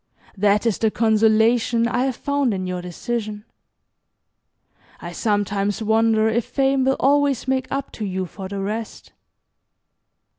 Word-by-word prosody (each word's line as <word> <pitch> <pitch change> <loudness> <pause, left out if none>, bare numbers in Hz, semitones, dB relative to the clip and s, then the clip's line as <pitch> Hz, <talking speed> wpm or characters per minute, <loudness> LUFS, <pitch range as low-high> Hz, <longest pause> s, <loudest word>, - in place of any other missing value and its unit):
That 205 +2 +2
is 225 -4 +1
the 220 - +2
consolation 225 +2 +3
I 245 +2 0
have 265 -2 -1
found 280 -6 0
in 185 -1 -3
your 180 -1 -3
decision. 210 +3 -5 1.5
I - - -7
sometimes 205 -1 -1
wonder 220 0 +3
if 225 +2 +1
Fame 270 +1 +1
will 270 0 +2
always 280 -2 +2
make 260 0 0
up 275 0 -3
to 215 - -5
you 190 -1 -2
for 190 +2 -8
the 200 0 -5
rest. 215 +3 -5
220 Hz, 140 wpm, -22 LUFS, 205-250 Hz, 1.5 s, consolation